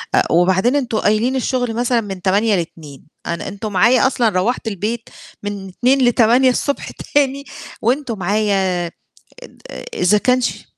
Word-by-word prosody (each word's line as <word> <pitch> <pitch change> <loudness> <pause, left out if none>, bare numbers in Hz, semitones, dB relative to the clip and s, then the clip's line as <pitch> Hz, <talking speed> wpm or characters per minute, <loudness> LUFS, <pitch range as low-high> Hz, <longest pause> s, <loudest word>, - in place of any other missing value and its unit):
أ - - +2
وبعدين 190 - +3
أنتوا 245 -6 0
قايلين 220 +5 +1
الشغل 245 -2 -1
مثلًا 240 0 +1
من 195 -3 -7
08:00 205 +2 +2
ل14:00، 165 -5 -6 0.2
أنا 170 - -4
أنتوا 205 +2 -5
معايا 235 +7 +4
أصلًا 240 -3 +1
روَّحت 215 +5 -1
البيت 220 +3 -3 0.3
من 200 -1 -5
14:00 255 +7 +2
ل08:00 245 +2 +4
الصبح 280 +3 -2
تاني، 280 0 -1 0.4
وأنتوا 245 0 0
معايا 190 -2 0 0.9
آآ، 65 - -8
إذا 200 +4 +3
كان 250 +3 +2
ش - - -3
220 Hz, 145 wpm, -18 LUFS, 190-250 Hz, 0.9 s, معايا